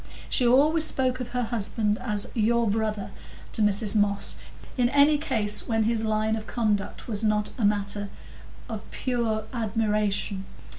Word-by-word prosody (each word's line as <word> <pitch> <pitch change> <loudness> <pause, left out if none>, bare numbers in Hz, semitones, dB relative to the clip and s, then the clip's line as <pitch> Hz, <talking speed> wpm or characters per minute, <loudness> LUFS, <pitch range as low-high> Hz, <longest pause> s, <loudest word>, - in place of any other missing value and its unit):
She 250 - +3
always 300 +6 +5
spoke 255 -4 +1
of 250 - -4
her 250 0 -1
husband 215 -1 -1
as 210 -4 -2
"your 235 +1 +2
brother" 210 -1 -1 0.4
to - - +2
Mrs 210 +1 +2
Moss 205 -1 +2 0.4
in 245 -2 +2
any 285 +2 +4
case 215 -8 0
when 225 -1 +1
his 225 0 0
line 220 0 0
of 220 0 -6
conduct 210 -4 -2
was 220 -2 -2
not 210 -1 +1
matter 205 0 0 0.6
of 220 -4 -5
pure 235 -4 -1
admiration. 210 -3 -1
220 Hz, 145 wpm, -26 LUFS, 210-240 Hz, 0.6 s, always